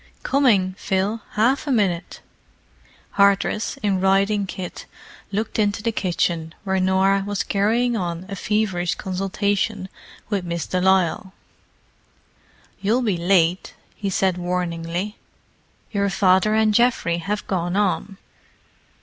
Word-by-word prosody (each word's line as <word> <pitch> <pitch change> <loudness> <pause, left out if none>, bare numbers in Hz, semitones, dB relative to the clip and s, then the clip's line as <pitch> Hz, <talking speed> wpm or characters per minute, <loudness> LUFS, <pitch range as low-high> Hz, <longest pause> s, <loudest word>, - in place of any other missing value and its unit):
"Coming, 215 -10 +3
Phil—half 215 +7 0
a - - 0
minute!" 185 -7 0 1.0
Hardress, 200 +2 +2
in 195 -3 +1
riding 195 +1 +2
kit, 180 -1 -7 0.4
looked 215 +3 -2
into 205 0 0
the 230 - +1
kitchen, 170 -5 -1
where 190 -1 0
Norah 190 +1 +2
was 205 0 -2
carrying 230 +5 +1
on 175 -3 -3
a 200 - -5
feverish 190 -5 0
consultation 195 +2 -2 0.4
with 200 -3 -1
Miss 170 -2 -3
de 185 - -1
Lisle. 190 +1 +2 1.5
"You'll 220 +6 +1
be 210 -5 +1
late," 175 0 +1 0.2
he 200 - -3
said 185 -1 +1
warningly. 175 +2 -3 0.7
"Your 200 -2 0
father 190 +2 +3
and 220 -1 +3
Geoffrey 220 -7 +2
have 205 +5 -3
gone 175 -1 -2
on." 200 -1 0
195 Hz, 115 wpm, -22 LUFS, 180-210 Hz, 1.5 s, Coming